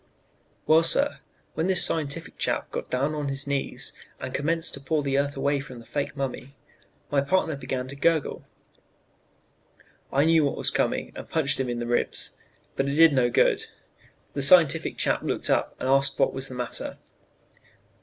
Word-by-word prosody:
"Well, 160 +1 +6
sir, 280 +12 +2 0.3
when 165 - -1
this 185 -2 +3
scientific 160 +1 -2
chap - - -1
got - - -5
down 140 +4 0
on 150 -2 -3
his 135 0 -3
knees, 140 -1 -3 0.3
and - - -6
commenced 165 +4 0
to - - -5
paw 145 +2 -1
the 135 -1 -1
earth 140 0 -2
away 140 +1 +1
from 135 -2 -9
the 115 - -12
fake 145 +1 -3
mummy, 135 0 -5 0.6
my 140 -1 +3
partner 160 +1 +1
began 130 -2 -4
to 140 - -7
gurgle. 160 +1 0 1.7
I 140 +2 +3
knew 160 -1 +4
what 140 - -1
was - - -1
coming - - -1
and - - -9
punched 150 -5 0
him 130 -2 -1
in 120 - -2
the 120 - -3
ribs, 120 0 -1 0.4
but 135 - 0
it 140 - -1
did 165 -1 +7
no 125 -3 +3
good. - - +2 0.7
The 140 - -2
scientific 160 +1 +5
chap - - +1
looked - - -1
up - - +1
and - - -3
asked 135 +1 +3
what - - +2
was 135 0 -5
the 130 - -8
matter. 125 -1 -4
140 Hz, 180 wpm, -26 LUFS, 135-160 Hz, 1.7 s, did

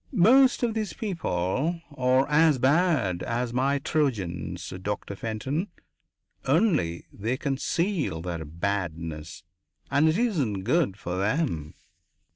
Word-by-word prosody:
"Most 255 +6 +5
of 235 -2 +1
these 215 -2 -2
people 160 - -1 0.2
are 130 +1 +3
as 155 -1 +4
bad 135 - +2
as 120 0 -2
my 135 +3 +2
Trojans, 115 - -2
Doctor 100 0 -4
Fenton. 125 - -3 0.8
Only 145 - +2
they 115 +6 -2
conceal 150 - -1
their 85 -3 -4
badness, 85 -2 -4 0.5
and 155 +3 +4
it 160 - +1
isn't 145 - 0
good 125 - +1
for 90 -3 -4
them." 100 - -1
130 Hz, 110 wpm, -26 LUFS, -, 0.8 s, Most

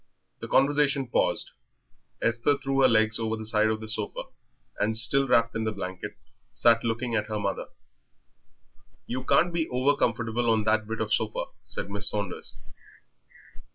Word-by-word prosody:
The - - -6
conversation 140 0 +2
paused. 120 - 0 0.7
Esther 115 +5 +2
threw 135 0 0
her 130 - +7
legs 110 -2 +3
over 110 0 -1
the 110 - -7
side 110 0 +2
of 110 0 -1
the 110 - -7
sofa, 110 -1 -1 0.6
and 110 +1 +1
still 135 +4 +3
wrapped 115 -2 +3
in 115 - -1
the 110 - -1
blanket, 95 -3 -6 0.3
sat 115 -1 +3
looking 115 +1 -2
at 105 -2 0
her 110 - -3
mother. 100 -1 -3 1.4
"You 130 +1 -4
can't 160 +6 +3
be 165 -1 -1
over 130 +3 +2
comfortable 115 0 0
on 110 -1 +2
that 110 0 +1
bit 115 0 -4
of 110 -1 -1
sofa," 110 -1 -1 0.2
said - - -4
Mrs. 100 +1 -4
Saunders. 100 -3 -3
115 Hz, 160 wpm, -27 LUFS, 110-130 Hz, 1.4 s, her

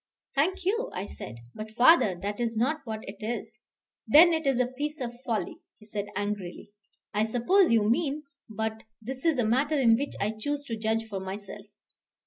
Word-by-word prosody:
"Thank 350 +6 +1
you," 460 +6 +1
I - - -3
said; 110 - -8 0.2
"but, 215 0 -8
father, 240 - +6
that 205 +2 -3
is 230 -2 -1
not 290 +7 +1
what 220 -2 -4
it 195 +1 -7
is." 225 +2 -5 0.5
"Then 335 +3 +8
it 320 -3 -1
is 270 -3 +3
a 250 - +4
piece 295 +5 -4
of 240 -1 -5
folly," 220 -8 -2 0.2
he 215 - -17
said 205 -1 -4
angrily. 205 -2 -4 0.4
"I 210 +1 +2
suppose 250 - +3
you 220 -2 +4
mean 290 +5 +1 0.3
but 220 0 -3 0.2
this 260 +4 -6
is 325 -4 +3
a 245 - +2
matter 280 +7 +2
in 230 -4 +6
which 280 +5 -3
I 205 +2 0
choose 285 +7 -3
to 230 - -3
judge 220 +1 -1
for 200 -3 -4
myself." 200 +2 -7
230 Hz, 190 wpm, -28 LUFS, 215-285 Hz, 0.5 s, Then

